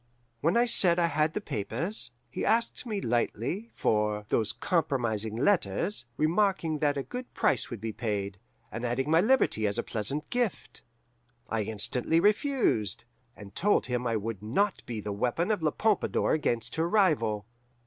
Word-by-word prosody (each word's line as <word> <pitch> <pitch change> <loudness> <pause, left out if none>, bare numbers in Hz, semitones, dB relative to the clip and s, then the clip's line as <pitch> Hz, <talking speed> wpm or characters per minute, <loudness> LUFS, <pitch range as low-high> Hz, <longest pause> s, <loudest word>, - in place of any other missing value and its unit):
"When 165 - +2
I 240 - +5
said 180 -7 +4
I 175 - +3
had 155 -1 +1
the - - -1
papers, 145 - -2 0.2
he - - -4
asked 230 +3 0
me 210 -3 -2
lightly 120 - -1
for 105 -1 0
'those 110 -2 +1
compromising 120 - -1
letters,' 170 - +1
remarking 165 -1 +1
that 145 -1 +1
a 140 - -1
good 250 - -7
price - - +1
would 120 - -6
be 110 +1 -4
paid, 100 -4 -3 0.3
and 115 - -5
adding 130 +4 -1
my 165 +1 +6
liberty 215 - +2
as 100 - -1
a - - 0
pleasant 125 +8 -3
gift. 245 -4 -2 0.7
I 110 -1 0
instantly 110 +9 0
refused, 210 - +1 0.3
and 100 -2 -12
told 205 +3 +2
him 125 -1 -2
I 115 - 0
would 110 -1 -3
not 175 - 0
be 115 -3 -4
the 105 0 -4
weapon 125 - 0
of 210 -5 0
La 155 - +2
Pompadour 215 +5 +1
against 120 -6 -1
her 165 +1 +1
rival. 135 - +2
140 Hz, 165 wpm, -29 LUFS, -, 0.7 s, my